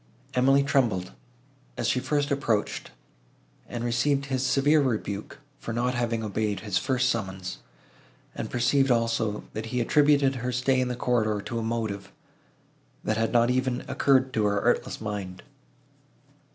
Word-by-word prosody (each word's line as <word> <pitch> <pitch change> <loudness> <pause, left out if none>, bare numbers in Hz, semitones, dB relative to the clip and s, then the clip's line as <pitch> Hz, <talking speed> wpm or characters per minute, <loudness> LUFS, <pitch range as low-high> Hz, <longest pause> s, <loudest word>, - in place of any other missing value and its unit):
Emily 135 +2 +4
trembled, 115 -10 +1 0.7
as - - -1
she 125 - +2
approached 140 -6 -1 0.8
and 120 -1 -4
received 135 +4 +1
his 130 -2 -1
severe 140 +4 +3
rebuke, 105 -6 -2 0.2
for 115 - -5
not 125 +2 0
having 115 -2 -1
obeyed 105 -1 -2
his 100 -4 0
first 130 -1 +1
summons; 95 -6 -3 0.7
and - - -5
perceived, 135 +3 +2
also, 115 -3 +1
that 110 +1 -4
he 125 +2 -2
attributed 140 +1 +3
her 125 +1 -2
stay 130 +1 +1
in 125 - 0
the 125 - -2
corridor 110 -4 +1
to 115 +3 -4
a - - -2
motive, 110 -4 -3 0.9
that 110 - 0
had 115 0 0
not 120 0 +4
even 130 0 -1
occurred 130 -1 +2
to 110 -2 +1
her 100 0 +2
artless - - 0
mind. 100 -4 -5
120 Hz, 145 wpm, -27 LUFS, 110-130 Hz, 0.9 s, Emily